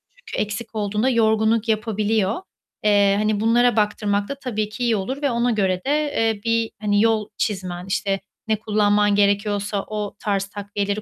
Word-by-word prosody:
çünkü -, -, -5 dB
eksik 220 Hz, +2 st, -6 dB
olduğunda 210 Hz, +4 st, 0 dB
yorgunluk 220 Hz, -1 st, +2 dB
yapabiliyor. 215 Hz, -, 0 dB, 0.4 s
Eee, 200 Hz, -1 st, +4 dB
hani 210 Hz, 0 st, +1 dB
bunlara 235 Hz, +1 st, +3 dB
baktırmak 210 Hz, -1 st, 0 dB
da 280 Hz, -, -3 dB
tabii 215 Hz, -4 st, -2 dB
ki 245 Hz, +3 st, -5 dB
iyi 235 Hz, -2 st, +2 dB
olur 260 Hz, +9 st, -3 dB
ve 280 Hz, -3 st, +1 dB
ona 235 Hz, +1 st, +1 dB
göre 190 Hz, -4 st, 0 dB
de, -, -, -1 dB
eee, 255 Hz, -8 st, +1 dB
bir 230 Hz, -1 st, +1 dB
hani, 205 Hz, -1 st, +2 dB
yol 220 Hz, -2 st, +2 dB
çizmen, 185 Hz, -3 st, -3 dB
işte 195 Hz, 0 st, -1 dB, 0.3 s
ne 220 Hz, -, +2 dB
kullanman 205 Hz, -1 st, +2 dB
gerekiyorsa 205 Hz, 0 st, +1 dB
o 210 Hz, -1 st, -4 dB
tarz 200 Hz, -3 st, -1 dB
takviyeleri 205 Hz, +1 st, -3 dB
210 Hz, 165 wpm, -22 LUFS, 205-225 Hz, 0.4 s, Eee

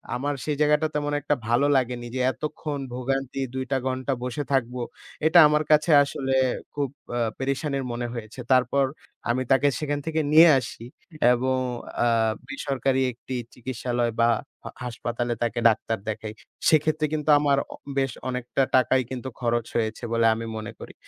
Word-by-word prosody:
আমার 145 Hz, +3 st, -1 dB
সেই 150 Hz, -1 st, 0 dB
জায়গাটা 150 Hz, +1 st, +3 dB
তেমন 145 Hz, 0 st, -1 dB
একটা 145 Hz, +1 st, +1 dB
ভালো 120 Hz, +4 st, +3 dB
লাগেনি। 125 Hz, -2 st, 0 dB
যে -, -, -1 dB
এতক্ষণ 150 Hz, -1 st, -5 dB
ভোগান্তি 135 Hz, +1 st, -2 dB
২ 130 Hz, 0 st, -3 dB
টা 135 Hz, -, +3 dB
ঘন্টা 130 Hz, +1 st, -1 dB
বসে 125 Hz, +4 st, -3 dB
থাকবো। 125 Hz, -1 st, 0 dB, 0.4 s
এটা 160 Hz, +2 st, +7 dB
আমার 150 Hz, +1 st, +2 dB
কাছে 150 Hz, +2 st, +4 dB
আসলে 135 Hz, -1 st, -3 dB, 0.4 s
খুব 145 Hz, -2 st, -1 dB, 0.3 s
আ -, -, 0 dB, 0.2 s
পেরেশানির 135 Hz, 0 st, -2 dB
মনে 120 Hz, 0 st, -3 dB
হয়েছে। 115 Hz, +1 st, -8 dB
তারপর 130 Hz, +2 st, +4 dB, 0.4 s
আমি 130 Hz, +2 st, +1 dB
তাকে 135 Hz, +2 st, +5 dB
সেখান 145 Hz, -1 st, -2 dB
থেকে 160 Hz, 0 st, 0 dB
নিয়ে 165 Hz, +2 st, +9 dB
আসি 115 Hz, -2 st, -8 dB, 0.5 s
এবং 130 Hz, +1 st, 0 dB, 0.5 s
আ -, -, +4 dB, 0.4 s
বেসরকারি 135 Hz, -1 st, -1 dB
একটি 125 Hz, +2 st, -7 dB, 0.2 s
চিকিৎসালয় 120 Hz, -1 st, -2 dB
বা 115 Hz, -, +5 dB, 0.3 s
হ -, -, -8 dB, 0.2 s
হাসপাতালে 120 Hz, 0 st, -3 dB
তাকে 120 Hz, 0 st, -1 dB
ডাক্তার 110 Hz, 0 st, -1 dB
দেখাই। 110 Hz, 0 st, -5 dB, 0.4 s
সেক্ষেত্রে 155 Hz, 0 st, +3 dB
কিন্তু 155 Hz, 0 st, -2 dB
আমার 145 Hz, -1 st, +2 dB, 0.2 s
অ -, -, -8 dB, 0.2 s
বেশ 135 Hz, -2 st, +1 dB, 0.2 s
অনেকটা 125 Hz, +2 st, -1 dB
টাকাই 130 Hz, 0 st, +4 dB
কিন্তু 130 Hz, +1 st, -4 dB
খরচ 120 Hz, -1 st, 0 dB
হয়েছে 110 Hz, +1 st, -1 dB
বলে 115 Hz, 0 st, +3 dB
আমি 115 Hz, -, -5 dB
মনে 110 Hz, 0 st, -6 dB
করি। -, -, -10 dB
130 Hz, 160 wpm, -25 LUFS, 120-145 Hz, 0.5 s, নিয়ে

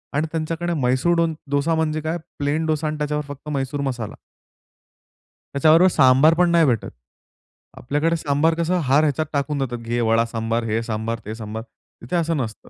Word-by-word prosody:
आणि 155 Hz, +3 st, +1 dB
त्यांच्याकडे 165 Hz, +2 st, -2 dB
म्हैसूर 130 Hz, +3 st, +1 dB
डो 170 Hz, 0 st, +3 dB, 0.3 s
डोसा 145 Hz, +3 st, +1 dB
म्हणजे 155 Hz, -1 st, -1 dB
काय, 160 Hz, +2 st, -2 dB, 0.2 s
प्लेन 145 Hz, +3 st, 0 dB
डोसा 155 Hz, 0 st, 0 dB
आणि 150 Hz, -, -3 dB
त्याच्यावर 150 Hz, 0 st, -2 dB
फक्त 145 Hz, +1 st, -9 dB
म्हैसूर 140 Hz, 0 st, -2 dB
मसाला. 125 Hz, -6 st, -4 dB, 1.4 s
त्याच्याबरोबर 160 Hz, +6 st, +5 dB
सांबार 135 Hz, +4 st, +5 dB
पण 175 Hz, +1 st, +3 dB
नाही 170 Hz, -1 st, +5 dB
भेटत. 120 Hz, -6 st, 0 dB, 0.9 s
आपल्याकडे 150 Hz, +6 st, 0 dB
सांबार 150 Hz, +2 st, +1 dB
कसं 170 Hz, +2 st, 0 dB
हर 140 Hz, +3 st, +3 dB
ह्याच्यात 155 Hz, +1 st, +1 dB
टाकून 145 Hz, +1 st, -1 dB
देतात. 125 Hz, -3 st, -2 dB
घे 115 Hz, +1 st, -3 dB
वडा 115 Hz, 0 st, +3 dB
सांबार, 115 Hz, 0 st, -2 dB
हे 115 Hz, +1 st, 0 dB
सांबार, 115 Hz, 0 st, -3 dB
ते 110 Hz, +2 st, -5 dB
सांबार. 110 Hz, 0 st, -6 dB, 0.4 s
तिथे 120 Hz, +9 st, -4 dB
असं 165 Hz, -2 st, +1 dB
नसतं. 110 Hz, -5 st, -5 dB
145 Hz, 170 wpm, -22 LUFS, 120-160 Hz, 1.4 s, त्याच्याबरोबर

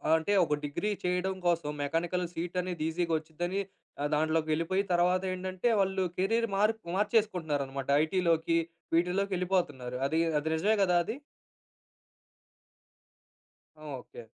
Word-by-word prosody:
అంటే 160 Hz, +5 st, +1 dB
ఒక 150 Hz, -, -1 dB
డిగ్రీ 145 Hz, +8 st, -2 dB
చేయడం 180 Hz, +1 st, 0 dB
కోసం 170 Hz, -3 st, +1 dB
మెకానికల్ 170 Hz, +5 st, -1 dB
సీట్ 170 Hz, +2 st, -4 dB
అనేది 175 Hz, -3 st, -4 dB
ఈజీగా 170 Hz, 0 st, -1 dB
వచ్చిదని 175 Hz, +4 st, -3 dB, 0.6 s
దాంట్లోకి 155 Hz, +1 st, +1 dB
వెళ్ళిపోయి, 165 Hz, +5 st, +1 dB
తర్వాత 180 Hz, +1 st, +3 dB
ఏంటంటే 185 Hz, +3 st, -2 dB
వాళ్ళు 190 Hz, -1 st, +1 dB
కెరియర్ 225 Hz, +5 st, +2 dB
మార్ 210 Hz, +3 st, +3 dB, 0.2 s
మార్చేసుకుంటున్నారనమాట. 160 Hz, -, 0 dB, 0.2 s
ఐటీలోకి 165 Hz, -1 st, +2 dB, 0.4 s
వీటిలోకెళ్ళిపోతున్నారు. 180 Hz, -7 st, 0 dB
అది, 160 Hz, +3 st, 0 dB, 0.2 s
అది 160 Hz, +2 st, -3 dB
నిజమే 205 Hz, +7 st, +2 dB
కదా! 180 Hz, -2 st, +3 dB
అది. 220 Hz, +7 st, -4 dB, 2.7 s
ఓకే. 130 Hz, -5 st, -8 dB
175 Hz, 110 wpm, -30 LUFS, 160-190 Hz, 2.7 s, తర్వాత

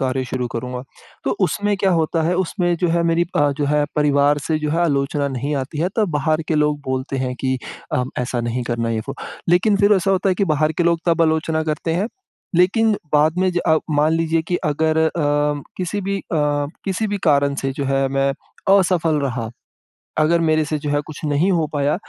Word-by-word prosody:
कार्य 130 Hz, 0 st, -1 dB
शुरू 125 Hz, -1 st, -3 dB
करूँगा। 125 Hz, +1 st, -5 dB, 0.4 s
तो 135 Hz, -, 0 dB
उसमें 205 Hz, +2 st, 0 dB
क्या 195 Hz, 0 st, +1 dB
होता 165 Hz, -1 st, +1 dB
है 170 Hz, +3 st, +1 dB
उसमें 175 Hz, -1 st, 0 dB
जो 175 Hz, +1 st, 0 dB
है 170 Hz, +1 st, +2 dB
मेरी 170 Hz, 0 st, +2 dB
अ, 145 Hz, 0 st, +3 dB
जो 145 Hz, -, +1 dB
है 150 Hz, +1 st, +2 dB
परिवार 145 Hz, 0 st, +3 dB
से 160 Hz, -1 st, +1 dB
जो 150 Hz, -1 st, -2 dB
है 165 Hz, +3 st, 0 dB
आलोचना 140 Hz, -1 st, 0 dB
नहीं 140 Hz, +3 st, -3 dB
आती 135 Hz, +3 st, -4 dB
है। 175 Hz, -, +2 dB
तब 215 Hz, -3 st, +2 dB
बाहर 155 Hz, +1 st, 0 dB
के 160 Hz, -, +1 dB
लोग 150 Hz, -1 st, +1 dB
बोलते 130 Hz, +1 st, -2 dB
हैं 130 Hz, -1 st, -2 dB
कि 130 Hz, -1 st, 0 dB, 0.4 s
अ, 125 Hz, -, +2 dB, 0.2 s
ऐसा 125 Hz, 0 st, -1 dB
नहीं 120 Hz, +1 st, -2 dB
करना, 115 Hz, -1 st, -2 dB
ये 110 Hz, -1 st, -1 dB
वो। -, -, -3 dB, 0.3 s
लेकिन 185 Hz, +4 st, +4 dB
फ़िर 200 Hz, +1 st, +4 dB
ऐसा 190 Hz, +1 st, 0 dB
होता 195 Hz, 0 st, +2 dB
है 185 Hz, -, +3 dB
कि 200 Hz, -, +1 dB
बाहर 155 Hz, +1 st, +1 dB
के -, -, +3 dB
लोग 170 Hz, -1 st, +2 dB
तब 165 Hz, -1 st, +3 dB
आलोचना 160 Hz, 0 st, +1 dB
करते 155 Hz, +1 st, -2 dB
हैं 190 Hz, +5 st, 0 dB, 0.5 s
लेकिन 220 Hz, +5 st, +4 dB, 0.2 s
बाद 155 Hz, +3 st, +3 dB
में, 185 Hz, 0 st, +2 dB
ज 175 Hz, -, 0 dB
अ, 160 Hz, -, +5 dB
मान 150 Hz, +1 st, +2 dB
लीजिए 165 Hz, 0 st, +1 dB
कि 175 Hz, -, +1 dB
अगर 155 Hz, +1 st, +1 dB
अ, -, -, -1 dB, 0.6 s
किसी 185 Hz, +3 st, -2 dB
भी 200 Hz, +1 st, -2 dB
अ, -, -, -9 dB, 0.6 s
किसी 195 Hz, +3 st, -1 dB
भी 205 Hz, 0 st, -2 dB
कारण 140 Hz, -3 st, +3 dB
से 135 Hz, -, 0 dB
जो 140 Hz, +1 st, -4 dB
है 135 Hz, 0 st, +1 dB
मैं 135 Hz, 0 st, +1 dB, 0.5 s
असफ़ल 175 Hz, -4 st, +2 dB
रहा। 125 Hz, -5 st, -2 dB, 0.7 s
अगर 160 Hz, +2 st, +3 dB
मेरे 155 Hz, -1 st, +2 dB
से 155 Hz, +1 st, -2 dB
जो 145 Hz, 0 st, -4 dB
है 145 Hz, 0 st, +1 dB
कुछ 155 Hz, -, -9 dB
नहीं 150 Hz, +5 st, +2 dB
हो 165 Hz, -3 st, +1 dB
पाया, 145 Hz, 0 st, +1 dB
155 Hz, 215 wpm, -20 LUFS, 140-175 Hz, 0.7 s, अ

